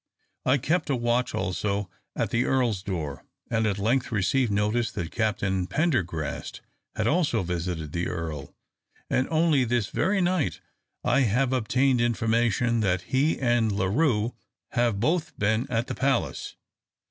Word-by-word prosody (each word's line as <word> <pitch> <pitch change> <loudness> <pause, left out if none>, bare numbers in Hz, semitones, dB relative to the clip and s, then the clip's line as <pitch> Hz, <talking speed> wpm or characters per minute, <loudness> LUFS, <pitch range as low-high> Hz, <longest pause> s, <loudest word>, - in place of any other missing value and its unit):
I 130 +2 +5
kept 160 +5 0
a 140 - +2
watch 120 +1 0
also 100 +2 -1 0.3
at - - -1
the 120 +2 +2
Earl's 120 -7 +1
door, 80 -8 -4 0.3
and 110 -1 +2
at 100 -2 0
length 120 +6 +1
received 110 +4 +1
notice 105 +3 +1
that 85 -1 -4
Captain 95 -4 0
Pendergrast 95 - -1 0.3
had 110 - -1
also 145 - +2
visited 85 -3 -3
the 85 +2 -1
Earl; 80 -5 -5 0.6
and 130 - +2
only 160 -4 +3
this 120 -3 0
very 195 +5 +1
night 180 -3 +1 0.4
I - - +3
have 125 +2 +2
obtained 130 +1 +2
information 115 0 +1
that 95 -4 +1
he 145 +5 +3
and 120 -4 +2
La 100 -2 0
Rue 115 0 +1 0.4
have 120 -4 +1
both 155 - 0
been 110 +3 +1
at 115 -1 0
the - - -4
palace. 135 -2 -1
115 Hz, 145 wpm, -26 LUFS, 100-130 Hz, 0.6 s, I